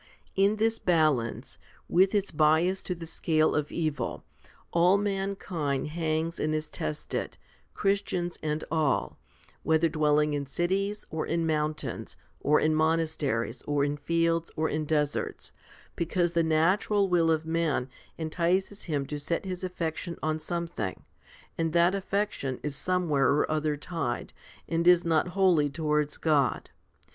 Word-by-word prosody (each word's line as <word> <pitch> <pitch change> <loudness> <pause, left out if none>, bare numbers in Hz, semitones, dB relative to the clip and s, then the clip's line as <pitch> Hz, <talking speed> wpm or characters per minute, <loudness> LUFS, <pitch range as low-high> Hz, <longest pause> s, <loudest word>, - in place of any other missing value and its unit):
In 200 +2 +3
this 225 +1 +1
balance, 155 -9 +1 0.3
with 190 +4 +3
its 200 -1 0
bias 160 +5 +3
to 180 - -3
the 165 -1 -8
scale 155 -1 +1
of 150 -1 -1
evil, 155 -4 -2 0.5
all 175 +3 +5
mankind 195 -8 -2
hangs 160 +1 -1
and 155 0 0
is 155 0 -3
tested, 75 -1 -4 0.4
Christians 190 -3 -1
and 155 0 -2
all, 155 -4 0 0.4
whether 160 +2 +3
dwelling 150 -1 +2
in 140 -1 -2
cities, 195 +7 -1
or 160 -1 -2
in 165 0 0
mountains, 155 -1 -2 0.2
or 150 +1 +3
in 155 0 +2
monasteries, 155 -7 0
or 145 -1 +1
in 145 0 -1
fields, 165 +2 0
or 160 0 +1
in 155 0 -1
deserts; 150 -1 -1 0.4
because 170 +1 0
the 170 -1 +2
natural 185 +6 +2
will 170 -3 +3
of 160 0 +1
man 160 -5 0 0.3
entices 175 +5 -1
him 145 -5 -1
to 145 +2 -5
set 165 +6 -2
his 185 -1 -5
affection 170 -1 -3
on 155 0 0
something, 170 - -4 0.6
and 165 -1 0
that 170 +2 +4
affection 195 -9 -2
is 150 -2 -3
somewhere 170 -6 +1
or 150 +2 +1
other 155 -1 0
tied, 150 -6 -3 0.3
and 165 +1 0
is 180 -1 +6
not 165 0 +2
wholly 175 -7 +4
towards 150 0 0
God. 150 -4 +1
160 Hz, 140 wpm, -28 LUFS, 150-175 Hz, 0.6 s, is